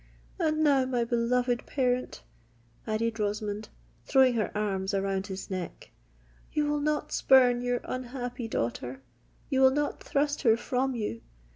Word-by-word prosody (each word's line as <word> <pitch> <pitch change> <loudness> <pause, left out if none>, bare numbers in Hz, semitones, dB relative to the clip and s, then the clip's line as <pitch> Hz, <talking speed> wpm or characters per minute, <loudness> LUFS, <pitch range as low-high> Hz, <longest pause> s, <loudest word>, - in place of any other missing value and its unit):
And 310 -2 +1
now, 275 -3 +4
my 250 -2 0
beloved 240 +1 0
parent," 255 -2 -1 0.6
added 225 +1 -1
Rosamond, 210 0 -2 0.4
throwing 265 -2 +5
her 220 -3 0
arms 195 -2 -1
around 195 0 -1
his 195 +1 -7
neck, 185 -2 -6 0.6
"you 300 -1 +1
will 295 0 0
not 300 0 -1
spurn 250 -2 +5
your 245 0 -1
unhappy 250 -1 -5
daughter,—you 125 - -4
will 265 - +8
not 290 +2 -1
thrust 290 +1 0
her 225 -4 +4
from 255 +2 -1
you! 210 - -3
245 Hz, 135 wpm, -28 LUFS, 210-265 Hz, 0.6 s, will